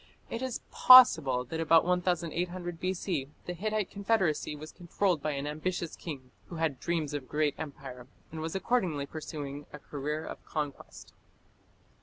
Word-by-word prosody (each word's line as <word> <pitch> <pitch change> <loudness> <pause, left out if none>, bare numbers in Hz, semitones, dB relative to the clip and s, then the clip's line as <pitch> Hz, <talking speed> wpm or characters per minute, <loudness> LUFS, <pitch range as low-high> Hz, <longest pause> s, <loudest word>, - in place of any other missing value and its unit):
It 230 - -3
is 260 -2 -3
possible 160 - +8
that 160 +6 -5
about 165 0 +5
1800 175 0 -1
B.C. 180 -6 -2 0.2
the 180 - -4
Hittite 215 +2 -2
confederacy 195 -8 0
was 155 +1 -9
controlled 175 -1 -1
by 155 +1 -1
an 140 0 -3
ambitious 160 +3 -3
king 135 -6 -8 0.2
who 175 - -8
had 160 -5 -1
dreams 160 -4 -2
of 145 - -2
a - - -18
great 150 -1 +1
empire, 135 -5 -8 0.2
and 160 0 -6
was 160 +2 -4
accordingly 190 -9 0
pursuing 145 -1 -7
a - - -8
career 150 +2 -4
of - - -8
conquest. 150 -3 -6
160 Hz, 155 wpm, -30 LUFS, 145-180 Hz, 0.2 s, possible